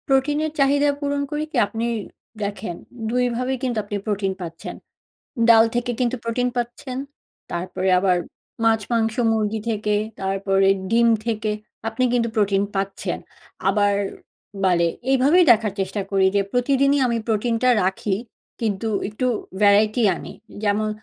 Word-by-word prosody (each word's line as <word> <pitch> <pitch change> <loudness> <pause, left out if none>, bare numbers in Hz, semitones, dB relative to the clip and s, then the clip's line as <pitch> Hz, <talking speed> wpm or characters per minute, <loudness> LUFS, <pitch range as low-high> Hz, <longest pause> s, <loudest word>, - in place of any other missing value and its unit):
প্রোটিনের 290 +3 +1
চাহিদা 285 +1 +4
পূরণ 285 -1 -1
করি 300 0 -1
কি 280 - -3
আপনি 225 +2 -3 0.6
দেখেন, 200 -3 -4 0.3
২ 250 +2 +1
ভাবেই 255 +2 -1
কিন্তু 245 -3 -1
আপনি 205 0 -4
প্রোটিন 200 -3 -1
পাচ্ছেন। 165 -1 -7 0.7
ডাল 225 -1 +8
থেকে 240 +1 -1
কিন্তু 250 0 +1
প্রোটিন 245 +2 0
পাচ্ছেন, 245 +2 -4 0.6
তারপরে 180 +2 -2
আবার 185 -1 +3 0.5
মাছ, 225 -1 +4
মাংস, 225 -1 +1 0.2
মুরগি 220 0 0
থেকে, 210 -1 0 0.3
তারপরে 195 0 +1 0.2
ডিম 235 +1 +4 0.2
থেকে 220 -2 -1 0.4
আপনি 225 +3 -1
কিন্তু 235 -1 +1
প্রোটিন 200 -2 +2
পাচ্ছেন। 195 0 -2 0.5
আবার 205 -1 +3 0.7
বালে 175 -2 +3 0.2
এইভাবেই 280 +7 +5
দেখার 215 -2 0
চেষ্টা 195 +2 -2
করি 195 -1 +3
যে - - +4
প্রতিদিনই 275 +3 +2
আমি 235 -1 0
প্রোটিনটা 230 +3 +1 0.2
রাখি 190 +1 0 0.4
কিন্তু 220 -1 -1 0.2
একটু 215 +5 -2 0.4
variety 210 +3 +4
আনি। - - -8 0.3
যেমন 210 +1 +1
225 Hz, 135 wpm, -22 LUFS, 200-250 Hz, 0.7 s, ডাল